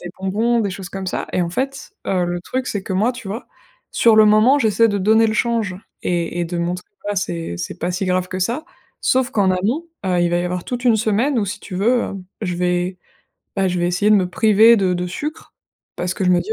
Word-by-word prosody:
des 175 - -7
bonbons, 225 +5 +1
des 205 -3 -1
choses 190 0 -7
comme 195 -1 -6
ça - - -3
et 180 - +1
en 170 - -2
fait, 270 +7 -4
heu, 185 -2 +1
le 175 0 -2
truc, 255 +8 -3
c'est 205 - -3
que 190 - -5
moi, 205 +6 +2
tu 250 -3 -9
vois? 210 +6 -5 0.5
Sur 230 -2 +5
le 215 - +8
moment, 215 +7 +5
j'essaie 225 -1 +4
de 205 -1 0
donner 220 +3 +4
le 215 - -1
change 225 -4 0 0.3
et 175 -1 -1
et - - 0
de 170 +1 -4
montrer 175 +1 -2 0.2
bah, 205 - -2
c'est 165 - -3
c'est 85 - -5
pas 175 - -2
si 180 +2 -2
grave 185 0 0
que 185 - -4
ça 235 - -1 0.4
sauf 260 0 +2
qu'en 200 -6 +2
amont, 215 - 0 0.2
heu, 180 -2 +1
il 175 - +2
va 175 - +2
y 175 - -1
avoir 180 0 -2
toute 245 0 -4
une 235 -3 +5
semaine 225 +5 +1
où 215 - +1
si 210 +3 -4
tu 185 - -9
veux, 235 +6 +2
heu, - - -4 0.3
je 180 -4 -1
vais, 180 +1 -1 0.6
bah, 195 - +2
je 180 -1 -1
vais 175 - +1
essayer 180 +4 +1
de - - +7
me 185 -3 +1
priver 220 +4 +5
de 190 -3 +1
de 180 0 -2
sucre, 300 - -6 0.4
parce 180 +1 -2
que - - -5
je 185 - +2
me 180 - +4
dis: 440 - -3
195 Hz, 255 wpm, -20 LUFS, 180-230 Hz, 0.6 s, le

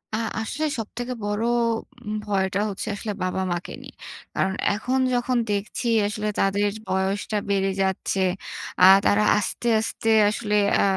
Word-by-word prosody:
আ - - 0 0.2
আসলে 300 +8 -2
সবথেকে 245 +3 -5
বড় 205 +2 -1 0.6
উম 215 - -2
ভয়টা 195 -1 0
হচ্ছে 195 - -5
আসলে 210 +1 -4
বাবা 185 +1 -1
মাকে 175 0 -4
নিয়ে। - - -12 0.4
কারণ 190 +1 0 0.2
এখন 250 +5 -1
যখন 245 0 +1
দেখছি 205 +4 -2 0.2
আসলে 210 +1 -3
তাদের 200 +1 +2 0.2
বয়সটা 190 +3 -1
বেড়ে 195 -1 +1
যাচ্ছে 190 0 -1 0.6
আ - - +6 0.2
তারা 210 +1 +4
আস্তে, 210 +3 -2
আস্তে 225 0 -2 0.2
আসলে 210 0 -1 0.3
আ - - +3
205 Hz, 140 wpm, -24 LUFS, 195-220 Hz, 0.6 s, আ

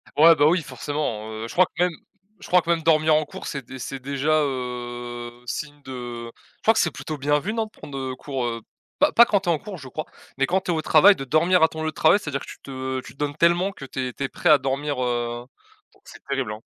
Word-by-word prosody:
Ouais, 165 +2 +8
bah 145 - +4
oui, 170 +2 +3
forcément, 130 -5 -4
heu, 110 +1 -5
je - - -9
crois 185 - +5
que 175 - -2
même 180 - +2 0.5
je - - -11
crois 180 0 +5
que 170 - -8
même 165 -1 +2
dormir 155 -1 +4
en 155 0 +2
cours, - - -9
c'est 140 -2 -4
dé 130 +2 -9
c'est 135 +1 -5
déjà, 140 +4 +1
heu, 120 -2 -4 0.2
signe 145 +4 -5
de 120 -3 -7 0.3
je - - -42
crois 225 - +4
que - - +2
c'est 170 - +2
plutôt 150 +2 -6
bien 145 +2 +2
vu, 195 +8 -3
non? 225 0 -1
De 215 - -15
prendre, 140 -8 -9
heu, 130 -1 -4
cours, 135 -1 -4
heu 115 -1 -3 0.4
pas 295 - +4
pas 235 - +8
quand 205 - +2
tu 185 - -2
es - - +5
en 165 - +2
cours 195 +4 -8
je 135 - -10
crois, 155 +4 -5 0.3
mais 135 - +3
quand 185 +7 +1
tu 185 - -2
es - - +2
au 160 -1 -1
travail 195 +8 +7
de 135 - -6
dormir 165 +5 +3
à - - +7
ton 160 0 -7
lieu 160 - 0
de - - -5
travail. 160 +6 +5
C'est-à-dire 145 -8 -4
que - - -8
tu - - -11
te 130 -1 -4
tu - - -12
te - - -28
donnes 145 0 -2
tellement 175 +4 +3
que 140 - -10
tu 130 0 -3
es - - -10
tu 140 - -5
es 135 - -1
prêt 175 - 0
à 150 -2 +7
dormir, 135 +1 -2
heu 120 -1 -2 0.5
donc - - -27
c'est - - -13
terrible, 135 -5 -2
hein. 105 - -8
145 Hz, 285 wpm, -24 LUFS, 130-165 Hz, 0.5 s, Ouais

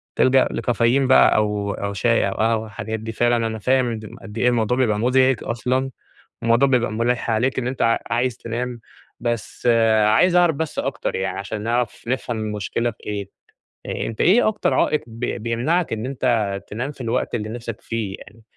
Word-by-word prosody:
تلجأ 130 0 +4
لكافيين 120 +3 +1
بقى 130 - +6
أو 105 -1 0
أو 100 0 -4
شاي، 115 +1 +2
أو - - -3
قهوة، 110 0 +1
الحاجات 110 +1 -5
دي، 110 +1 -5
فعلًا 120 0 +1
أنا 110 -1 -5
فاهم 130 +3 +2 0.2
م 115 +3 -10
قد 105 +1 -10
إيه 125 - +2
الموضوع 120 +1 +1
بيبقى 110 -5 +2
مزعج 130 +1 +3
أصلًا، 130 +3 -1 0.5
الموضوع 115 +4 +4
بيبقى 120 -4 +1
مُلّح 120 +1 0
عليك 125 +4 +1
إن 120 - -1
أنت 130 +1 -2
ع 115 0 +3
عايز 120 0 0
تنام 120 +1 -4 0.4
بس 120 0 -3
آآ، 110 -2 +4
عايز 180 +12 +4
أعرف 175 -4 +4
بس 160 -1 -4
أكتر - - -2
يعني 95 0 -2
عشان 105 +1 -5
نعرف 120 0 -1
نفهم 125 -2 -2
المشكلة 110 +2 -2
في 110 - -16
إيه، 100 -2 -4 0.8
أنت 115 - -4
إيه 215 +6 +5
أكتر 215 -1 0
عائق 150 - +2
بي 115 +2 -4
بيمنعك 120 +8 0
إن 110 +2 -3
أنت 115 -7 0
تنام 125 +7 -4
في 135 - -11
الوقت 120 +1 -1
اللي 105 -1 -3
نفْسك 115 -1 -6
فيه 110 -4 -3
يعني؟ 110 +2 -15
115 Hz, 185 wpm, -22 LUFS, 110-125 Hz, 0.8 s, بقى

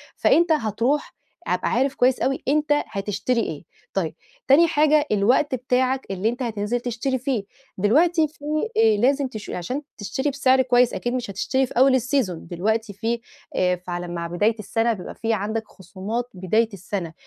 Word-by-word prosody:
فأنت 340 +1 +3
هتروح 245 +1 0 0.3
هابقى 180 0 0
عارف 265 +3 +1
كويس 255 +1 +3
أوي 265 +1 -1
أنت 300 +2 +1 0.2
هتشتري 205 +5 -1
إيه، - - -5 0.3
طيب - - -1 0.3
تاني 315 +5 +6
حاجة 305 -1 +3
الوقت 245 +7 +3
بتاعك 255 +1 0
اللي 195 +3 0
أنت 245 +3 -4
هتنزل 220 0 -1
تشتري 245 +2 -2
فيه، 250 -4 -1 0.3
دلوقتي 310 - +3
في 290 -1 -15 0.3
آآ، 220 -1 +5
لازم 270 +5 +2
تش 215 -5 -8
عشان 250 +11 -3 0.2
تشتري 225 +8 -2
بسعر 265 -1 +3
كويس 245 -1 +3
أكيد 240 - -2
مش 245 -3 -3
هتشتري 260 +7 0
في - - -11
أول 260 +1 +6
السيزون 245 - -1
دلوقتي 210 +5 -1
في 230 +4 -2 0.4
آآ، 180 0 +2
فعلي 175 0 -6
مع 170 -1 -4
بداية 205 +6 +1
السنة 225 +3 0
بيبقى 190 -5 -8
في 225 0 -1
عندك 220 +2 -2
خصومات 195 +6 -5
بداية 210 +5 +1
السنة 185 -3 -5
235 Hz, 165 wpm, -23 LUFS, 205-265 Hz, 0.4 s, تاني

